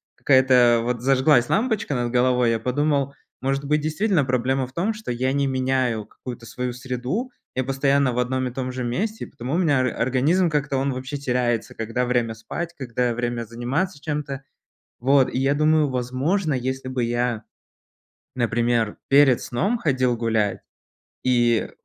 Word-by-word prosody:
какая-то 130 -3 +5
вот 120 -1 -2
зажглась 130 -1 +3
лампочка 210 - 0
над 120 -1 -1
головой, 125 -1 +3
я 115 - 0
подумал, 140 +3 0 0.3
может 135 +2 -1
быть, 150 +1 +1
действительно, 160 +2 +1
проблема 130 +1 0
в - - -17
том, 190 +9 0
что 215 - -6
я 130 +2 0
не 140 0 +1
меняю 130 -4 0
какую-то 120 -2 -9
свою 125 +2 -4
среду, 130 - -3 0.2
я 130 - 0
постоянно 135 0 +2
в 120 - -1
одном 130 +1 0
и - - -5
том 130 0 -3
же 125 0 -4
месте, 210 - -2
и - - -13
потому 130 +6 -5
у - - +2
меня 155 -7 +3
ор 130 - +1
организм 135 +10 +1
как-то, 145 -2 -1
он 135 0 0
вообще 130 +3 -5
теряется, 125 -4 -1
когда 115 +3 -2
время 120 -2 0
спать, 170 +9 -5
когда 125 -2 -1
время 120 0 -2
заниматься 130 - -2
чем-то. 145 -3 -4 0.6
Вот. 135 +1 +4
И - - 0
я 135 +2 +2
думаю, 155 0 +3
возможно, 135 +7 0
если 130 +1 -3
бы 130 -1 -2
я, 120 -1 -1 0.9
например, 120 -2 0
перед 135 -3 +5
сном 195 - -1
ходил 130 - +1
гулять, 110 -3 0 0.6
и 120 -2 +2
130 Hz, 165 wpm, -23 LUFS, 120-140 Hz, 0.9 s, какая-то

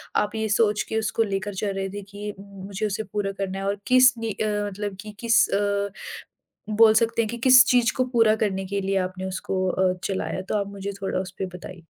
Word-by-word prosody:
आप 210 +1 0
ये 220 0 -1
सोच 210 0 +2
के 220 - -1
उसको 220 +1 0
लेकर 200 0 -3
चल 200 +1 -2
रहे 195 0 -3
थे 205 +1 -6
कि 205 +1 -6
मु 200 -1 -12
मुझे 200 +2 -3
उसे 210 +1 -2
पूरा 205 -2 -3
करना 195 -1 -3
है 195 - -4
और 200 - -1
किस 255 +1 +6
नी 225 -1 -3
अ, 215 +2 -2 0.2
मतलब 205 0 -5
कि 215 - -9
किस 235 0 +4
अ, 200 0 0 0.8
बोल 220 +1 +6
सकते 230 +1 +2
हैं 220 - -2
कि 235 - -5
किस 255 +1 +9
चीज़ 245 -2 +3
को 255 - +2
पूरा 225 -2 +5
करने 195 -2 -2
के 200 +1 -2
लिए 195 0 -1
आपने 185 0 -8
उसको 185 0 -2
अ, 185 0 +2
चलाया? 190 -1 -2
तो 195 - -4
आप 200 - -2
मुझे 200 0 -5
थोड़ा 190 - -1
उसपे 190 0 -5
बताइए। 175 -1 -11
205 Hz, 225 wpm, -24 LUFS, 195-220 Hz, 0.8 s, किस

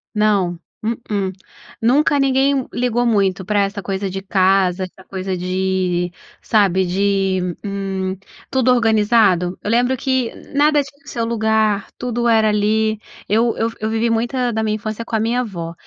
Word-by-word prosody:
Não, 200 -5 +1 0.2
mm-mm. 210 -4 -2 0.5
Nunca 280 +5 +3
ninguém 270 0 +3
m 270 -3 -1
ligou 245 0 0
muito 195 -4 +1
pra 205 0 +1
essa 200 +1 -2
coisa 195 0 -2
de 195 +1 -5
casa, 190 -1 +2
essa 185 +1 -16
coisa 190 -1 -3
de 185 -1 -1 0.3
sabe, 190 -4 +2
de, 190 -1 0
hum, 195 -2 -3 0.3
tudo 260 -1 +3
organizado. 210 -6 +3
Eu - - -3
lembro 245 +2 +2
que 260 -2 -1 0.2
nada 295 +1 +4
tinha 280 0 -13
seu 235 -4 -3
lugar, 220 -3 +1
tudo 240 -1 -1
era 220 -2 +4
ali 215 +1 +1 0.3
eu 225 +3 +2
eu 225 - 0
f 230 - -13
eu 215 - -2
vivi 225 +1 0
muita 240 +2 0
da 220 -1 -1
minha 215 -1 0
infância 215 +1 -5
com 235 - -3
a - - +2
minha 230 +3 +1
avó. 170 -8 -5
215 Hz, 165 wpm, -19 LUFS, 190-235 Hz, 0.5 s, nada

